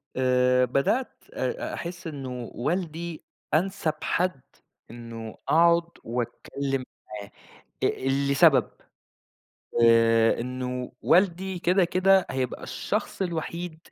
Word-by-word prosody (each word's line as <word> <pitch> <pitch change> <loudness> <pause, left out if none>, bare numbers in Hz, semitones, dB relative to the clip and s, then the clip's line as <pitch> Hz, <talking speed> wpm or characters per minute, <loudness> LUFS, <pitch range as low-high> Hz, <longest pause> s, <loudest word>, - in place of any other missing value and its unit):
آآ 125 0 +3
بدأت 140 - 0
آآ 485 - -3
أحِس 175 0 -6
إنه 130 -5 -6
والدي 165 +3 -3 0.3
أنسَب 175 0 +1
حد 180 -6 0 0.5
إنه 115 -2 -8
أقعُد 170 +1 +4
وأتكلّم 130 +3 -3 0.4
معاه 100 - -11 0.5
آآ - - 0 0.3
لسبب، 140 - +5 1.2
آآ 115 0 +5
إنه 125 0 -4
والدي 185 +1 +2
كده، 180 +2 +3
كده 185 +2 +3
هيبقى 130 -2 -3
الشخص - - -3
الوحيد 170 -1 -4
150 Hz, 95 wpm, -26 LUFS, 125-175 Hz, 1.2 s, لسبب